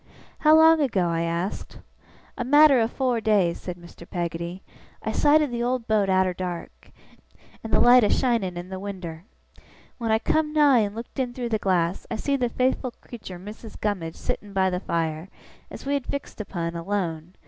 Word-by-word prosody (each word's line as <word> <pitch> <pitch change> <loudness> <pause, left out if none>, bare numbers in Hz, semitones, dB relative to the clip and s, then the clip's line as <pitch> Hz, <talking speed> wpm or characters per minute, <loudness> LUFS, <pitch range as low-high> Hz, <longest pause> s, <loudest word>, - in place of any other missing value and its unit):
'How 310 0 +6
long 320 0 +7
ago?' 195 -11 +1
I 165 0 0
asked. 170 +3 -3 0.6
'A 250 - -3
matter 290 +1 +6
o' 225 - +2
fower 245 -1 -1
days,' 200 -6 +2
said 180 -1 -6
Mr. 170 0 -14
Peggotty. 170 +1 -4 0.4
'I - - -2
sighted 300 -1 +3
the 235 0 -3
old 245 -1 -1
boat 210 -3 +2
arter 185 -1 +2
dark, 180 -1 -7 0.7
and 225 - -6
the - - +4
light 245 0 +7
a 210 - +3
shining 225 -9 +1
in 175 +1 -7
the 190 0 -6
winder. 185 -4 -7 0.7
When 230 -2 -1
I 220 - +4
come 300 +6 0
nigh 290 -5 +5
and 205 -1 -1
looked 230 +4 -8
in 245 -2 -2
through 245 -2 -3
the 220 -2 0
glass, 180 -3 0
I 230 - -2
see 280 +6 -1
the 250 -3 0
faithful 255 0 0
creetur 200 -6 -9
Missis 210 +4 -10
Gummidge 185 -6 -3
sittin' 205 -1 -5
by 190 -1 +2
the 180 - -1
fire, 165 -1 -2 0.4
as - - -10
we 280 - -1
had 280 -3 -2
fixed 280 -5 -5
upon, 170 -4 -4
alone. 170 -2 -3
205 Hz, 190 wpm, -25 LUFS, 175-245 Hz, 0.7 s, long